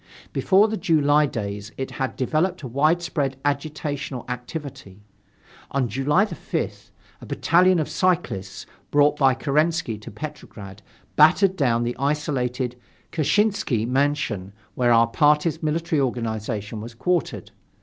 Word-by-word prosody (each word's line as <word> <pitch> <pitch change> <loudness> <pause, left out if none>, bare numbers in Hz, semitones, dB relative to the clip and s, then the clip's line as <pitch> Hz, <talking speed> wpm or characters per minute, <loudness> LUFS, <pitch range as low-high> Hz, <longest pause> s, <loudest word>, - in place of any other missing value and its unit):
Before 200 +3 +4
the 220 0 -3
July 150 -3 +3
days 105 -3 -5
it 135 - -4
had 130 -3 -3
developed 160 +6 0
a - - -4
widespread 145 0 0
agitational 145 -3 -3
activity. 125 - -7 0.7
On 135 -2 0
July 135 - +2
5th, 215 - -5 0.3
a - - -9
battalion 180 +2 +3
of 155 - 0
cyclists, 150 - -1 0.2
brought 145 0 +4
by 135 -2 +4
Kerensky 150 -3 0
to 105 - -10
Petrograd, 105 -6 -9 0.4
battered 180 +5 +5
down 120 -7 +1
the 120 +1 -2
isolated 130 -3 -1 0.4
Kshessinsky 175 - +1
mansion 130 -8 -1 0.2
where 120 -1 +2
our 115 0 +6
party's 150 +6 +2
military 160 -1 0
organization 110 -4 -3
was 115 +1 -9
quartered. 175 +7 -1
140 Hz, 120 wpm, -23 LUFS, 120-155 Hz, 0.7 s, our